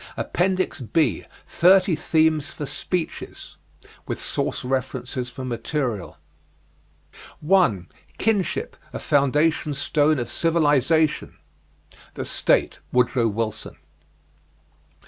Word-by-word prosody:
APPENDIX 185 Hz, -2 st, 0 dB
B 145 Hz, -, +1 dB, 0.2 s
THIRTY 185 Hz, 0 st, +4 dB
THEMES 155 Hz, -1 st, +1 dB
FOR 150 Hz, -, -6 dB
SPEECHES 160 Hz, +4 st, -5 dB, 0.5 s
With -, -, -3 dB
Source -, -, -2 dB
References 130 Hz, -1 st, -3 dB
for 130 Hz, +1 st, -7 dB
Material. 120 Hz, -, -3 dB, 1.2 s
1. 150 Hz, -, +3 dB, 0.3 s
KINSHIP, 205 Hz, -5 st, 0 dB, 0.2 s
A -, -, -3 dB
FOUNDATION 150 Hz, +2 st, +1 dB
STONE 150 Hz, +2 st, +2 dB
OF 120 Hz, -2 st, -2 dB
CIVILIZATION. 160 Hz, -1 st, +2 dB, 0.8 s
"The -, -, -4 dB
State," -, -, +1 dB
Woodrow 125 Hz, -1 st, +2 dB
Wilson. 110 Hz, 0 st, -3 dB
145 Hz, 90 wpm, -23 LUFS, 125-165 Hz, 1.2 s, THIRTY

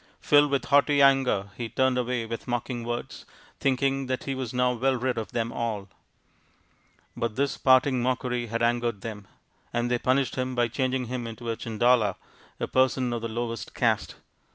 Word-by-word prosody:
Filled 145 Hz, 0 st, +4 dB
with 140 Hz, -3 st, 0 dB
haughty 145 Hz, 0 st, +4 dB
anger 135 Hz, -8 st, +3 dB
he 120 Hz, -2 st, -5 dB
turned 130 Hz, +1 st, +2 dB
away 125 Hz, -1 st, -1 dB
with 115 Hz, +3 st, -6 dB
mocking 120 Hz, 0 st, -2 dB
words, 120 Hz, +1 st, -5 dB, 0.4 s
thinking 135 Hz, 0 st, +1 dB
that 130 Hz, 0 st, -2 dB
he 135 Hz, -, -2 dB
was 130 Hz, -3 st, -4 dB
now 125 Hz, 0 st, +2 dB
well 130 Hz, +2 st, +1 dB
rid 125 Hz, 0 st, -1 dB
of 115 Hz, -2 st, -4 dB
them 115 Hz, 0 st, -1 dB
all. 110 Hz, -5 st, -3 dB, 1.3 s
But 115 Hz, -1 st, -3 dB
his 140 Hz, 0 st, +1 dB
parting 130 Hz, -1 st, +4 dB
mockery 125 Hz, -1 st, -1 dB
had 115 Hz, +1 st, -2 dB
angered 120 Hz, -3 st, 0 dB
them, 105 Hz, -2 st, -7 dB, 0.4 s
and 120 Hz, +1 st, -1 dB
they 120 Hz, -, +2 dB
punished 130 Hz, -2 st, +1 dB
him 130 Hz, 0 st, -2 dB
by 120 Hz, -1 st, +2 dB
changing 130 Hz, +1 st, -1 dB
him 120 Hz, -1 st, -4 dB
into 115 Hz, +1 st, -5 dB
a -, -, -2 dB
Chandala, 115 Hz, -2 st, +2 dB, 0.4 s
a -, -, -2 dB
person 130 Hz, -1 st, +2 dB
of 120 Hz, -, -3 dB
the 115 Hz, -, -2 dB
lowest 115 Hz, 0 st, -4 dB
caste. -, -, +1 dB
125 Hz, 175 wpm, -26 LUFS, 115-130 Hz, 1.3 s, Filled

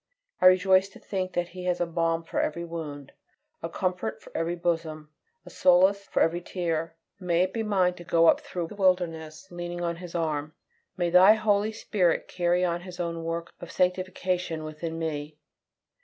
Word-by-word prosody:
I 185 Hz, -, +8 dB
rejoice 185 Hz, +1 st, +5 dB
to -, -, -15 dB
think 185 Hz, -2 st, -4 dB
that 175 Hz, 0 st, -1 dB
He 180 Hz, 0 st, -8 dB
has 180 Hz, -1 st, 0 dB
a 175 Hz, -, +1 dB
balm 165 Hz, 0 st, 0 dB
for -, -, -3 dB
every 170 Hz, +3 st, -2 dB
wound, 150 Hz, -5 st, -7 dB, 0.5 s
a 165 Hz, -, -4 dB
comfort 180 Hz, -11 st, -2 dB
for -, -, -17 dB
every 165 Hz, +1 st, -1 dB
bosom, 165 Hz, -3 st, -2 dB, 0.3 s
a -, -, -11 dB
solace 190 Hz, +2 st, +4 dB
for -, -, +2 dB
every 170 Hz, +2 st, 0 dB
tear. 165 Hz, -3 st, -3 dB, 0.2 s
May 175 Hz, -1 st, +2 dB
it 185 Hz, -, -2 dB
be 230 Hz, -, -1 dB
mine 190 Hz, -4 st, +2 dB
to 175 Hz, -, -11 dB
go 165 Hz, -1 st, +3 dB
up -, -, +5 dB
through 175 Hz, -3 st, -5 dB
the -, -, -9 dB
wilderness 175 Hz, -4 st, 0 dB
leaning 175 Hz, 0 st, -5 dB
on 170 Hz, -1 st, -2 dB
His 175 Hz, -1 st, -9 dB
arm. 155 Hz, -2 st, -2 dB, 0.4 s
May 175 Hz, -1 st, 0 dB
Thy 185 Hz, +4 st, +8 dB
Holy 215 Hz, 0 st, +1 dB
Spirit 190 Hz, -5 st, 0 dB
carry 175 Hz, 0 st, +1 dB
on 175 Hz, 0 st, -1 dB
His 180 Hz, -1 st, -10 dB
own 170 Hz, -1 st, -3 dB
work 165 Hz, 0 st, -4 dB
of 175 Hz, -, -8 dB
sanctification 180 Hz, -2 st, -1 dB
within 155 Hz, +1 st, -5 dB
me. 150 Hz, -2 st, -4 dB
175 Hz, 185 wpm, -27 LUFS, 165-185 Hz, 0.5 s, I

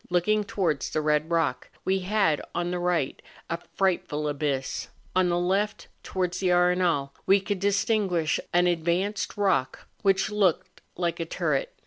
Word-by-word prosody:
Looking 210 Hz, +5 st, +2 dB
towards 185 Hz, -10 st, -1 dB
the -, -, -1 dB
red 150 Hz, +1 st, +1 dB
rock, 160 Hz, -7 st, 0 dB, 0.2 s
we 190 Hz, -1 st, 0 dB
liad 195 Hz, -7 st, +2 dB
on 175 Hz, 0 st, -1 dB
the 180 Hz, -, -2 dB
right 175 Hz, -6 st, 0 dB, 0.3 s
a 170 Hz, -, -1 dB, 0.2 s
frightful 165 Hz, -6 st, 0 dB
abyss; 145 Hz, -2 st, -2 dB, 0.3 s
on 185 Hz, -1 st, +3 dB
the 175 Hz, -, +1 dB
left, 195 Hz, +4 st, 0 dB
towards 180 Hz, -1 st, -2 dB
the 190 Hz, -, 0 dB
Arenal, 180 Hz, -5 st, +2 dB, 0.2 s
we 195 Hz, +1 st, +6 dB
could 200 Hz, 0 st, -3 dB
distinguish 200 Hz, -4 st, +1 dB
an 175 Hz, 0 st, +4 dB
ad¬ 175 Hz, -2 st, +1 dB
vanced 185 Hz, +4 st, -1 dB
rock, 185 Hz, -11 st, 0 dB, 0.2 s
which 195 Hz, +1 st, +2 dB
looked 185 Hz, -3 st, 0 dB, 0.2 s
like 170 Hz, -1 st, -1 dB
a 165 Hz, -, -1 dB
turret. -, -, -1 dB
180 Hz, 155 wpm, -26 LUFS, 165-195 Hz, 0.3 s, we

